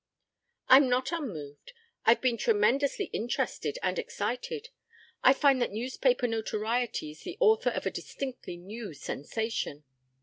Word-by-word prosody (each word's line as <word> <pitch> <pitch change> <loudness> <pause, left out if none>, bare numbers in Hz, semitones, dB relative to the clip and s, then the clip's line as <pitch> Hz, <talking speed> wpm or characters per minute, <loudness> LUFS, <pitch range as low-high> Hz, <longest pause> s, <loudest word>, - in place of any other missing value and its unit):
"I'm 260 0 +8
not 255 +2 +1
unmoved. 190 - -6 0.3
I've 230 - +5
been 255 -2 +2
tremendously 240 - +2
interested 240 - -2
and - - 0
excited. 440 - -4 0.5
I 260 - +8
find 275 -1 +4
that 240 - +1
newspaper 250 +3 +1
notoriety 225 -4 -1
is 155 - -15
the 360 - -7
author 445 -1 +4
of - - -4
a - - 0
distinctly 255 -9 -6
new 200 0 -8
sensation." 150 - -3
245 Hz, 130 wpm, -29 LUFS, 215-270 Hz, 0.5 s, I'm